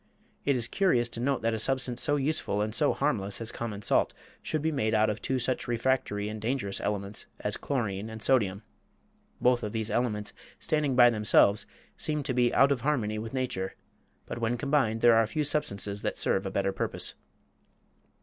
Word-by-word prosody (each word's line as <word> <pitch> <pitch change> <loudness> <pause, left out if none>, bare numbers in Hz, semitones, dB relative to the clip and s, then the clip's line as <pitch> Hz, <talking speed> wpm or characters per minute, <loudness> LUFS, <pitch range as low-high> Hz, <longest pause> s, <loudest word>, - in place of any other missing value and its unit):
It 140 - +3
is 120 -2 0
curious 125 -12 +2
to 115 - -5
note 135 0 0
that 115 0 +1
a 110 - -2
substance 130 0 -1
so 145 - +3
useful 145 -7 0
and 110 0 -3
so - - +3
harmless 100 -2 -1
as 115 -1 -4
common 105 -3 -5
salt - - +2 0.3
should 155 -2 -2
be 160 - +1
made 110 -7 0
out 110 0 +3
of 105 - -6
two 130 - -1
such 130 +1 -1
refractory 115 -4 0
and 105 0 -6
dangerous 110 -4 -2
elements 100 0 -3
as - - -1
chlorine 110 -6 -2
and 110 0 -7
sodium. 110 -5 +1 0.8
Both 125 -1 +3
of 105 -1 -4
these 110 -1 -1
elements, 105 -3 -1 0.2
standing 150 -4 0
by 120 -1 +7
themselves, 105 -2 +3 0.3
seem 150 -1 -1
to 135 -2 -2
be 120 -1 +3
out 135 +1 +5
of 130 -4 0
harmony 115 -7 0
with 115 +4 -6
nature, 95 -8 -2 0.5
but 115 - -6
when 115 +1 0
combined 135 -6 +1
there 120 -1 +7
are 115 -1 +4
few 155 +7 -1
substances 105 -9 -1
that - - -2
serve - - 0
a - - -2
better 95 - 0
purpose. 95 - -2
115 Hz, 190 wpm, -29 LUFS, 105-135 Hz, 0.8 s, by